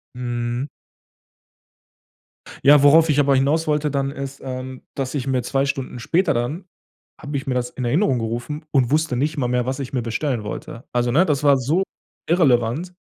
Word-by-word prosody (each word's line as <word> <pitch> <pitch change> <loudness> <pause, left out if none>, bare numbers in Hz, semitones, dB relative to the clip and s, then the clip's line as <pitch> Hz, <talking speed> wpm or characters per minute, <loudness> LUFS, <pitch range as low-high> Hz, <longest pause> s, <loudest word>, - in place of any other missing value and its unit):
Mhm. 120 +1 -3 2.0
Ja, 145 0 +7
worauf 160 +3 +6
ich 145 0 +3
aber 140 -1 +4
hinauswollte 150 +2 +1
dann 140 0 -1
ist 140 0 -7
ähm, 130 0 -6
dass 135 -2 -3
ich 140 -3 -3
mir 130 -2 +1
2 135 0 0
Stunden 135 -3 -4
später 170 +9 +1
dann 130 +11 -3 0.5
habe 145 0 -6
ich 135 - -6
mir 130 - 0
das 125 0 -1
in 130 - -6
Erinnerung 135 - +2
gerufen 120 +7 -4
und 130 -3 +2
wusste 155 -3 +1
nicht 150 +5 -1
mal 125 -3 0
mehr, 125 0 0
was 130 +2 -3
ich 135 -2 -5
mir 125 -3 -1
bestellen 120 0 -2
wollte. 115 +3 -7
Also, 120 0 +1
ne, 170 +8 +4
das 150 -4 0
war 140 -2 +5
so 150 +9 +1 0.5
irrelevant 150 0 +2
135 Hz, 180 wpm, -21 LUFS, 125-150 Hz, 2.0 s, Ja